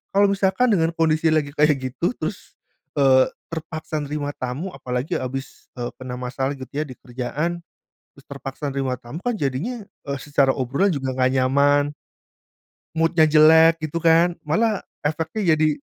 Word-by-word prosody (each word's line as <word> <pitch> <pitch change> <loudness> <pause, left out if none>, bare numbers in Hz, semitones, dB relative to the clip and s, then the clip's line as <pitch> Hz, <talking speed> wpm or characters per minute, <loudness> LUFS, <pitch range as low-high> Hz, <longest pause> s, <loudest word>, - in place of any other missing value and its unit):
Kalau 200 +1 +6
misalkan 200 +5 +2
dengan 165 -4 +2
kondisi 160 0 +2
lagi 150 -2 +1
kayak 150 0 +4 0.2
gitu 125 - -1
terus, - - -6 0.4
eee, 130 -1 +5 0.2
terpaksa 160 -2 -5
nerima 145 0 -4
tamu, 130 +8 -4
apalagi 125 +3 -3
habis, 135 +1 -5
eee, 120 0 -2
kena 125 -1 -6
masalah 125 +2 -2
gitu 130 -2 -9
ya, 150 - 0
di 140 -4 -9
kerjaan, 145 +8 -3 0.5
terus 140 - -20
terpaksa 140 +1 -6
nerima 130 -2 -1
tamu, 135 +9 -9
kan 245 +2 0
jadinya, 195 - -3 0.2
eee, 140 0 -2
secara 140 -1 +2
obrolan 140 +11 0
juga 135 -5 -2
nggak 130 0 +2
nyaman. 145 +2 +3 1.0
Mood-nya 165 0 +3
jelek 160 +2 +6
gitu 155 +1 -2
kan. 170 +1 +4
Malah 210 +6 +1 0.2
efeknya 160 +4 0
jadi 155 -1 +1
150 Hz, 150 wpm, -22 LUFS, 135-165 Hz, 1.0 s, Kalau